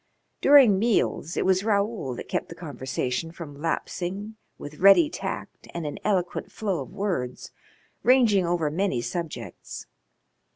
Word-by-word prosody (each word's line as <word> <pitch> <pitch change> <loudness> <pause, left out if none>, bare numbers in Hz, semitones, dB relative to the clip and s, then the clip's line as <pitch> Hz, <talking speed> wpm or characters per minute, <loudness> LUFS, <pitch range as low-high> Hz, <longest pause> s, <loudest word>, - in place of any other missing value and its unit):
During 265 -9 +7
meals 205 -7 0
it - - +1
was 190 0 +3
Raoul 205 - 0
that - - -8
kept - - -2
the - - -8
conversation 130 +3 -3
from 150 -5 -10
lapsing 195 +5 -3 0.2
with 145 +1 -9
ready 200 - +7
tact - - -6
and 170 -2 -3
an 145 - -5
eloquent 185 -4 -1
flow 200 -5 -2
of - - -8
words, 180 -12 -3 0.5
ranging 235 -6 +5
over 170 -3 0
many 170 -7 0
subjects. 135 - -6
180 Hz, 135 wpm, -26 LUFS, 150-205 Hz, 0.5 s, During